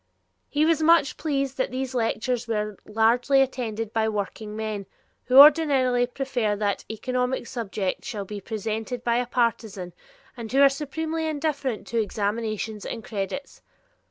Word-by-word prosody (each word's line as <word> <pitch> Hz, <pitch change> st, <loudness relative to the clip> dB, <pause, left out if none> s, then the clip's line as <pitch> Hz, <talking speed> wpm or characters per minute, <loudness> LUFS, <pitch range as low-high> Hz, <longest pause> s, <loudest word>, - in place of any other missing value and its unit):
He 300 Hz, +1 st, +2 dB
was 320 Hz, -1 st, +2 dB
much 325 Hz, -3 st, +4 dB
pleased 275 Hz, -3 st, -2 dB
that 260 Hz, -, +1 dB
these 260 Hz, +1 st, -4 dB
lectures 240 Hz, 0 st, -1 dB
were 210 Hz, -2 st, -2 dB
largely 235 Hz, +5 st, +3 dB
attended 225 Hz, -5 st, -1 dB
by 220 Hz, -1 st, +1 dB
workingmen 210 Hz, 0 st, -4 dB, 0.4 s
who 255 Hz, +1 st, +3 dB
ordinarily 275 Hz, -5 st, +6 dB
prefer 245 Hz, -5 st, -1 dB
that 205 Hz, -1 st, -1 dB
an -, -, -9 dB
economic 250 Hz, +3 st, -1 dB
subject 210 Hz, -6 st, -3 dB
shall 205 Hz, -3 st, -5 dB
be 205 Hz, +1 st, -7 dB
presented 220 Hz, +3 st, -4 dB
by 235 Hz, 0 st, +2 dB
a 245 Hz, 0 st, -1 dB
partisan, 220 Hz, -7 st, -1 dB, 0.4 s
and 230 Hz, -3 st, -7 dB
who 270 Hz, -, +2 dB
are 275 Hz, -, +8 dB
supremely 320 Hz, +3 st, -3 dB
indifferent 290 Hz, -6 st, -2 dB
to 230 Hz, -1 st, +1 dB
examinations 215 Hz, 0 st, -3 dB
and 230 Hz, -, -5 dB
credits. 210 Hz, +7 st, -5 dB
235 Hz, 145 wpm, -25 LUFS, 215-270 Hz, 0.4 s, are